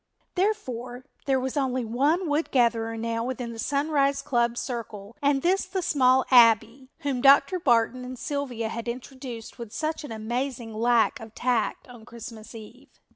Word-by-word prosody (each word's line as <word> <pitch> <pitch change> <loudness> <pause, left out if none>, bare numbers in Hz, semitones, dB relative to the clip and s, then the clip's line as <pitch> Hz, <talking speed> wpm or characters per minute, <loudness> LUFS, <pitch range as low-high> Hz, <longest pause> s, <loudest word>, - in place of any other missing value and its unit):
Therefore 255 - -2 0.2
there 265 -1 +3
was 260 +2 -3
only 260 -3 0
one 290 +11 +1
Wood 295 +2 0
Gatherer 230 -3 +1
now 230 0 -2
within 245 -1 -4
the 225 - -9
Sunrise 280 +1 +1
club 240 -4 +1
circle 225 -4 -6
and 280 -1 +2
this 370 +2 +2
the 375 0 -3
small 260 -3 +3
Abbie, 230 +1 +5
whom 275 -5 -1
Dr. 280 +7 +5
Barton 250 -3 +2
and 255 0 -7
Sylvia 245 -4 -3
had 230 +1 -5
introduced 245 -1 -7
with 230 -3 -7
such 310 +4 -3
an 290 - -8
amazing 235 +1 -3
lack 235 +4 +2
of 225 -1 -11
tact 240 -3 -1
on 240 -3 -13
Christmas 230 -1 -10
eve. 235 +5 -13
250 Hz, 160 wpm, -26 LUFS, 230-280 Hz, 0.2 s, Abbie